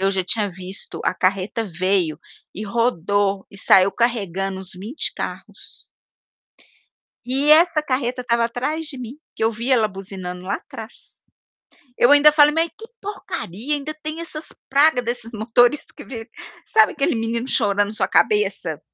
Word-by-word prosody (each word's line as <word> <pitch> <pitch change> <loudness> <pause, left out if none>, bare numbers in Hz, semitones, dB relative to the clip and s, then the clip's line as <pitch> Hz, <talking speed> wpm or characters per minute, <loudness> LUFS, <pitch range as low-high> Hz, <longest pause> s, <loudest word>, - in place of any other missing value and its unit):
Eu 195 +1 +2
já 190 - 0
tinha 205 +2 +2
visto, 185 +2 -8
a - - +2
carreta 195 +4 -1
veio 185 -5 +1 0.4
e 210 - -5
rodou 200 -3 0
e 200 - -14
saiu 190 0 +5
carregando 195 -5 -1
uns 190 - -10
20 225 +11 -2
carros - - -8 1.4
e 275 +4 +1
essa 325 0 +5
carreta 255 -3 -2
estava 235 -1 +1
atrás 295 +7 -2
de 280 -4 -6
mim, 250 +3 -8 0.2
que 220 - -1
eu 225 - +2
vi 235 +4 -4
ela 230 -4 +4
buzinando 185 -2 -7
lá 195 +2 -2
atrás. 225 +1 -10 0.8
Eu 245 - +5
ainda 290 +1 +8
falei: 295 0 +5
"Mas 330 +1 +2
que 450 - -10 0.2
porcaria, 290 - -5
ainda 295 +1 -3
tem 310 +2 -4
essas 320 -2 -6 0.2
praga 280 -1 +4
desses 240 -1 -4
motorista 240 +6 +2
que 290 - -10
veio" 230 -2 -8 0.4
sabe, 440 0 +4
aquele 280 -4 0
menino 230 +2 -2
chorando 205 -3 +2
na 210 - -7
sua - - 0
cabeça 425 0 +1
235 Hz, 160 wpm, -21 LUFS, 200-285 Hz, 1.4 s, ainda